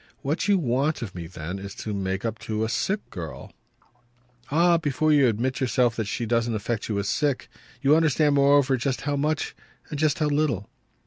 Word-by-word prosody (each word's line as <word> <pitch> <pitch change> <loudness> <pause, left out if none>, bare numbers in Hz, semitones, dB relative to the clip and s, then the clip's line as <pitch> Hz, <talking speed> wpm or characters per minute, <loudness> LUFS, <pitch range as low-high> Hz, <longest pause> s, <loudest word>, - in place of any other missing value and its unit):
"What 150 +9 -1
you 200 -1 +4
want 140 -1 0
of 100 - -6
me 85 -2 -6
then 90 +2 -6
is 100 0 -8
to 105 - -5
make 95 +1 -2
up 115 0 -3
to 110 0 -2
a 110 - -1
sick 205 - -1
girl." 80 -4 -7 1.0
"Ah 170 +3 +4
but 145 -5 -3
you 150 -4 +5
admit 120 +4 -1
yourself 125 -2 +2
that 110 - -2
she 115 - -2
doesn't 115 0 +1
affect 110 +2 -3
you 105 - -1
as 100 0 -1
sick. 145 0 0 0.4
You 140 +2 +6
understand 155 -2 +3
moreover 140 -1 +4
just 130 +1 -2
how 145 0 -1
much 150 +2 -1 0.4
and 150 - -4
just 155 -2 +2
how 155 - +1
little." 145 -9 0
130 Hz, 195 wpm, -25 LUFS, 110-150 Hz, 1.0 s, You